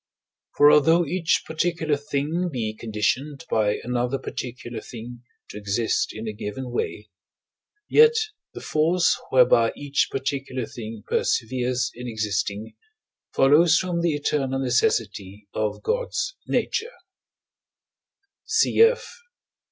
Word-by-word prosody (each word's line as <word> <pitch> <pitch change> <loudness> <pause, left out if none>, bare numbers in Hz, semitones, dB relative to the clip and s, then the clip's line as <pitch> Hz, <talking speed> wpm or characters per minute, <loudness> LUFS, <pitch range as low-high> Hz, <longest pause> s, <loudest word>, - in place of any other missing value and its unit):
For 145 0 +7
although 165 +3 +5
each 170 +2 0
particular 160 -1 0
thing 150 +5 -2
be 115 -5 -3
conditioned 120 +8 -2
by 105 -2 +2
another 125 +2 -1
particular 120 -3 -6
thing 120 +1 -9 0.3
to 105 - -8
exist 105 +1 0
in 110 +1 -7
a 110 - -3
given 120 +5 -6
way, 105 -3 -4 0.8
yet 460 +1 +6 0.4
the - - -7
force 170 +3 +2
whereby 120 -3 +5
each 145 0 0
particular 135 -2 -3
thing 110 -2 -8
perseveres 125 +1 0
in 125 +1 -8
existing 105 -1 -3 0.6
follows 150 +5 +5
from 180 -2 -1
the 170 -3 +1
eternal 140 -2 -1
necessity 105 -5 -1
of 110 -1 -2
God's - - -2
nature 465 +3 -1 1.5
(cf. 450 +2 +4
130 Hz, 110 wpm, -24 LUFS, 110-160 Hz, 1.5 s, For